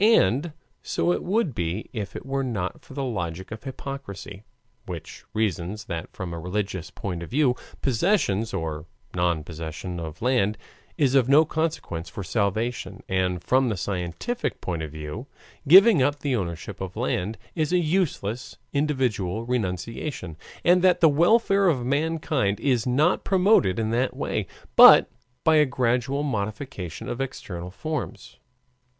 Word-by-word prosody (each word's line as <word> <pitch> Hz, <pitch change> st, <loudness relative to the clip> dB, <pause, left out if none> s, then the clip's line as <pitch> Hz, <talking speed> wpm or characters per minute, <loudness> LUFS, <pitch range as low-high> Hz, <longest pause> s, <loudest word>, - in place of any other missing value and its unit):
And 155 Hz, -, +4 dB, 0.3 s
so 175 Hz, -, 0 dB
it -, -, -2 dB
would 195 Hz, -, 0 dB
be 85 Hz, +2 st, -3 dB
if 105 Hz, -6 st, -5 dB
it -, -, -7 dB
were 135 Hz, 0 st, -1 dB
not 105 Hz, -8 st, -3 dB
for 135 Hz, -, -14 dB
the 140 Hz, -, -2 dB
logic 95 Hz, -7 st, -4 dB
of 110 Hz, 0 st, -7 dB
hypocrisy, 130 Hz, -7 st, -7 dB, 0.5 s
which -, -, -8 dB
reasons 105 Hz, -1 st, -1 dB
that 85 Hz, -1 st, -5 dB
from 90 Hz, -3 st, -6 dB
a 85 Hz, -, -5 dB
religious 95 Hz, -1 st, -3 dB
point 90 Hz, -4 st, -5 dB
of 85 Hz, -, -7 dB
view 130 Hz, -1 st, +2 dB, 0.3 s
possession 130 Hz, -, +2 dB
or 80 Hz, 0 st, -4 dB, 0.3 s
non 85 Hz, -3 st, +1 dB
possession 85 Hz, +2 st, -6 dB
of 80 Hz, +3 st, -7 dB
land 120 Hz, -5 st, +2 dB, 0.4 s
is 140 Hz, -5 st, +3 dB
of 135 Hz, -2 st, +4 dB
no 150 Hz, +3 st, +7 dB
consequence 155 Hz, -, -3 dB
for 100 Hz, -, -6 dB
salvation, 100 Hz, 0 st, -2 dB
and 90 Hz, -1 st, 0 dB
from 130 Hz, -1 st, +3 dB
the 105 Hz, -, -2 dB
scientific 90 Hz, -, -3 dB
point 85 Hz, -3 st, -3 dB
of 80 Hz, -, -4 dB
view, 80 Hz, -, -7 dB, 0.4 s
giving 190 Hz, -, +8 dB
up 145 Hz, +2 st, +1 dB
the 140 Hz, -3 st, 0 dB
ownership 90 Hz, -1 st, -4 dB
of 95 Hz, -1 st, -5 dB
land 115 Hz, -4 st, -1 dB, 0.2 s
is 155 Hz, -2 st, -1 dB
a 180 Hz, -, +4 dB
useless 155 Hz, -, -1 dB, 0.2 s
individual 125 Hz, -9 st, 0 dB
renunciation, 115 Hz, -, -3 dB, 0.3 s
and 180 Hz, +1 st, +5 dB
that 185 Hz, -1 st, +4 dB
the 165 Hz, -, +7 dB
welfare 195 Hz, +5 st, +4 dB
of 130 Hz, -8 st, +1 dB
mankind 145 Hz, -6 st, 0 dB
is 130 Hz, -4 st, +1 dB
not 150 Hz, +8 st, +2 dB
promoted 185 Hz, -, +3 dB
in 110 Hz, -1 st, -1 dB
that 125 Hz, +3 st, 0 dB
way, -, -, -2 dB, 0.3 s
but -, -, +9 dB, 0.3 s
by 160 Hz, -1 st, +5 dB
a 150 Hz, -, +6 dB
gradual 125 Hz, +2 st, 0 dB
modification 110 Hz, -, -4 dB
of 125 Hz, -, -3 dB
external 90 Hz, -9 st, -5 dB
forms. 155 Hz, -, -5 dB
115 Hz, 150 wpm, -25 LUFS, 90-145 Hz, 0.5 s, but